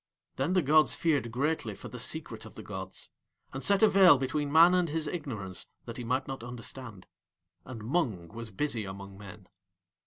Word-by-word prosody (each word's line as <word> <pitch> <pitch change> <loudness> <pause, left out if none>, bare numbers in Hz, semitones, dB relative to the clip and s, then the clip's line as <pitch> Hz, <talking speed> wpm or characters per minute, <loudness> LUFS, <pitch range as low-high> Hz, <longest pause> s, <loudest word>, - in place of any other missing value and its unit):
Then 140 +7 0
the 185 -2 +3
gods 155 +2 +4
feared 145 -8 +1
greatly 130 -4 -1
for - - -9
the - - -8
Secret - - -3
of - - -12
the - - -9
gods, - - -7 0.4
and 135 - -4
set 200 +5 +3
a - - +9
veil 190 -7 +7
between 140 +2 -2
Man 165 +3 +7
and 180 -2 +2
his 160 +1 -1
ignorance 115 - -5 0.2
that 115 - -7
he 125 - -5
might 130 +4 -1
not 135 -3 -6
understand. 120 -4 -9 0.6
And 115 -4 -8
Mung 115 - -1
was 115 +2 -7
busy 115 +1 -1
among 100 0 -8
Men. 100 0 -12
130 Hz, 185 wpm, -30 LUFS, 110-155 Hz, 0.6 s, a